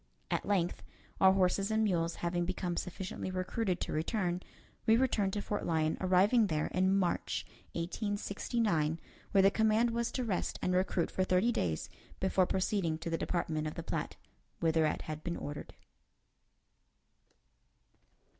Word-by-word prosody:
At - - -1
length, 185 -4 +1 0.4
our 190 0 +7
horses 195 +1 +2
and 220 0 +2
mules 170 -5 +1
having 175 0 0
become 180 0 -2
sufficiently 185 +2 -4
recruited 185 +1 -1
to - - -2
return, 175 +2 -1 0.5
we 225 +1 +6
returned 225 -6 +2
to 205 - -2
Fort 205 - -2
Lyon, 160 -1 +1
arriving 195 +5 +4
there 155 -4 0
in 185 +1 +2
March, 180 -3 0 0.3
1869, 200 -2 -1 0.3
where 195 -1 +5
the 195 - +6
command 220 +2 +3
was 235 0 -1
to 255 - -1
rest 205 -6 -1
and 180 - +1
recruit 180 -2 +1
for 185 - +1
thirty 185 +5 +3
days 80 - -1 0.3
before 190 -1 +2
proceeding 185 -4 0
to 165 +1 -5
the - - +2
Department 155 -3 -1
of 155 - -5
the - - -5
Platte, - - -3 0.4
whither 160 -1 +3
it - - -2
had 155 0 -6
been 170 -1 -2
ordered. 145 +1 -7
185 Hz, 150 wpm, -33 LUFS, 170-205 Hz, 0.5 s, our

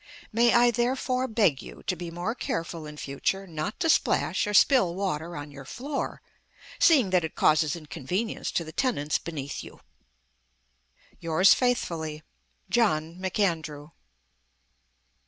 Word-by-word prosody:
May 235 +1 +4
I 240 0 +6
therefore 255 +2 0
beg 205 - +2
you - - -11
to 185 - -1
be 175 0 -6
more 175 +6 -3
careful 165 -8 -4
in 150 0 -10
future 150 +8 -2
not 160 +2 -5
to 330 - +2
splash 310 - +2
or 210 - -2
spill 190 -3 +5
water 170 -4 -3
on 145 0 -7
your 140 -1 -10
floor, 275 - -5 0.6
seeing 265 - +5
that 180 -2 +3
it 160 - -5
causes 155 0 +3
inconvenience 170 - -4
to 170 - 0
the 160 - -9
tenants 155 - 0
beneath 145 -4 -6
you? - - -12 1.4
"Yours 165 +4 +5
faithfully, 160 -11 -1 0.5
Jno. 165 -9 +1
McAndrew." 165 -6 -2
175 Hz, 135 wpm, -27 LUFS, 155-230 Hz, 1.4 s, I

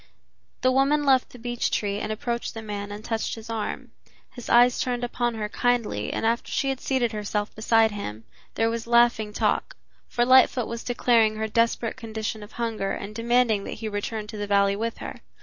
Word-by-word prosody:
The 255 - +4
woman 275 +3 +3
left 265 -2 +4
the - - -13
beech 240 0 -2
tree 205 -1 -1
and 215 - -3
approached 235 +2 -3
the 225 - -6
man 205 -1 -5
and 210 +2 -8
touched 225 -1 -2
his 225 0 -9
arm. 220 -2 -4 0.4
His 245 - -9
eyes 245 +1 +5
turned 245 -1 -1
upon 240 -1 -1
her 215 -1 -2
kindly 230 - 0
and - - -2
after 230 +1 0
she 275 - 0
had 265 -1 -2
seated 255 -5 0
herself 210 0 -3
beside 225 0 +3
him, 115 - -6 0.3
there 225 0 +2
was 230 0 -4
laughing 235 -2 +3
talk, - - 0 0.3
for 240 - +1
Lightfoot 255 -1 +5
was 235 +1 -6
declaring 235 -3 +3
her 220 0 -2
desperate 230 +1 0
condition 220 -2 -4
of 205 - -11
hunger 220 -4 -2
and 200 +2 -6
demanding 230 -2 +2
that - - -5
he 220 0 -5
return 210 +1 -3
to 210 0 -8
the 205 0 -3
valley 200 0 +3
with 230 +2 -3
her. - - -8
225 Hz, 200 wpm, -25 LUFS, 210-240 Hz, 0.4 s, eyes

